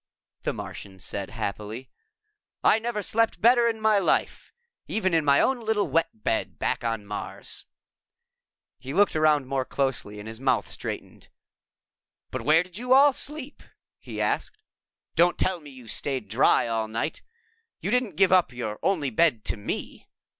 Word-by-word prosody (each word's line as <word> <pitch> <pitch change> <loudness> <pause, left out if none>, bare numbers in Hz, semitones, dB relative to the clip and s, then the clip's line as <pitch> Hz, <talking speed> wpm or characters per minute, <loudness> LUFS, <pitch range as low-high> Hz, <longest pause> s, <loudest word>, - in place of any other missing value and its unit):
the - - -1
Martian 95 -1 -8
said 95 +2 -5
happily. 110 +3 -5 0.8
"I - - +5
never 225 -2 -3
slept 225 +2 +1
better 235 +1 +5
in 225 -1 -3
my 215 -1 +4
life, - - 0 0.4
even 190 -5 0
in 165 -1 +3
my 140 -1 +4
own 265 -1 +2
little 215 -2 +1
wet 165 -9 -1
bed - - -1
back - - -1
on 115 -3 -2
Mars." 105 0 -7 1.1
He 135 +3 -6
looked 200 -2 +4
around 155 -3 +3
more 135 0 -1
closely 130 -6 -2
and 105 +1 -8
his 110 0 -7
mouth 135 0 +1
straightened. - - -6 1.0
"But - - -3
where 160 +3 +4
did 180 +3 -10
you 250 +1 +2
all 280 +1 +7
sleep?" 295 +1 -5 0.4
he - - -8
asked. - - -1 0.6
"Don't 175 +1 +4
tell 185 -2 0
me 150 -2 -12
you 130 -4 -13
stayed 130 -1 -3
dry 120 +2 +4
all 115 -1 -1
night! 115 +8 -3 0.6
You 195 - -3
didn't 250 -8 +1
give 190 +1 +4
up 185 -5 +4
your 110 -4 -5
only 155 -9 0
bed 120 -3 +2
to - - 0
me?" 100 - -5
155 Hz, 160 wpm, -26 LUFS, -, 1.1 s, all